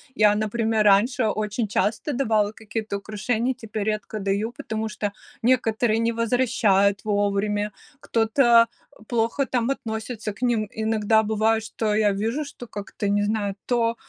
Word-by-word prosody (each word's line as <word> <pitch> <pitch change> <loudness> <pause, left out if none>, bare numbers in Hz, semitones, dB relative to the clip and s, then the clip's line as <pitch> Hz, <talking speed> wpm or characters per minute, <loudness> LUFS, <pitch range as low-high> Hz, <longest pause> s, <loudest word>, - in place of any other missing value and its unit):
Я, 210 -2 +5
например, 220 +1 0
раньше 220 +4 +4
очень 215 +1 -1
часто 215 +7 0
давала 220 -5 +1
какие-то 215 -1 -5
украшения, 220 +4 -1
теперь 220 -4 -5
редко 215 0 -3
даю, 200 +3 -1
потому 220 -2 -4
что 205 -1 -3 0.3
некоторые 225 -2 +2
не 230 0 +1
возвращают 215 -4 +2
вовремя, 205 0 0 0.3
кто-то 230 +1 +4 0.4
плохо 235 +4 0
там 245 -2 -1
относится 220 -3 -4
к 210 - -19
ним. 235 -4 +1
Иногда 220 0 +2
бывает, 220 +1 +1
что 220 -1 -2
я 210 -1 +3
вижу, 225 +9 -1
что 245 -4 -10
как-то, 205 0 -5
не 205 +1 +2
знаю, 205 -2 -1
то 235 -2 +1
220 Hz, 140 wpm, -24 LUFS, 210-230 Hz, 0.4 s, Я